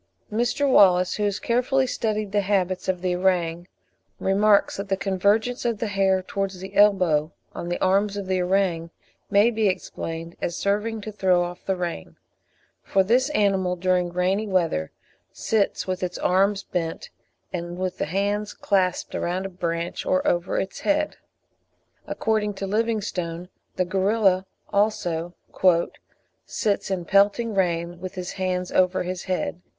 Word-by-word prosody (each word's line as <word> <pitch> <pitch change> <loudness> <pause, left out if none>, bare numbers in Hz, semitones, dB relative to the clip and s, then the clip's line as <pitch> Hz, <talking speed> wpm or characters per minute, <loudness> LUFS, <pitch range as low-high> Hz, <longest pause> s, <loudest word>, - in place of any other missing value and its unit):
Mr. 245 +6 +1
Wallace, 185 -7 +5
who 210 - -1
has 200 -1 0
carefully 255 +3 +1
studied 215 -4 -2
the 205 0 +2
habits 190 -2 0
of 185 -1 -1
the 180 -1 +1
orang, 175 -2 0 0.5
remarks 200 +2 +3
that 200 0 -5
the 195 - +1
convergence 205 +6 +1
of 235 -2 0
the 225 - -2
hair 190 -1 +2
towards 195 0 -3
the 190 +1 -8
elbow 180 -7 +4 0.2
on 175 - -5
the 175 - -2
arms 200 +2 +2
of 200 - -4
the 185 -1 0
orang 180 -3 0 0.4
may 210 +3 +4
be 220 -2 +1
explained 165 -2 -4
as 170 - -2
serving 210 +2 -1
to 215 - -6
throw 185 -4 +2
off 175 0 -7
the 190 - +1
rain, 175 - -5 0.7
for 195 -1 +2
this 250 +8 +2
animal 195 -8 +1
during 180 0 +1
rainy 185 +4 0
weather 165 - 0 0.4
sits 215 -3 0
with 185 0 -3
its 180 -1 -3
arms 195 +2 +2
bent, 165 -3 -4 0.4
and 175 0 -4
with 185 0 -3
the - - 0
hands 205 +4 -1
clasped 185 -3 0
round 185 +2 -2
a - - -3
branch 170 -2 -3
or 185 - +1
over 175 0 0
its 195 - -4
head. 300 0 0 0.9
According 215 -2 -1
to 195 - -4
Livingstone, 195 -5 -2 0.3
the 185 - +1
gorilla 190 0 +2 0.3
also 175 -5 0 1.1
"sits 205 -5 -1
in 185 -3 -2
pelting 205 +5 +3
rain 175 -2 0
with 185 +1 -6
his 180 0 -5
hands 185 -1 -2
over 185 0 +2
his 180 0 -5
head." 180 -1 -2
190 Hz, 155 wpm, -24 LUFS, 180-205 Hz, 1.1 s, Wallace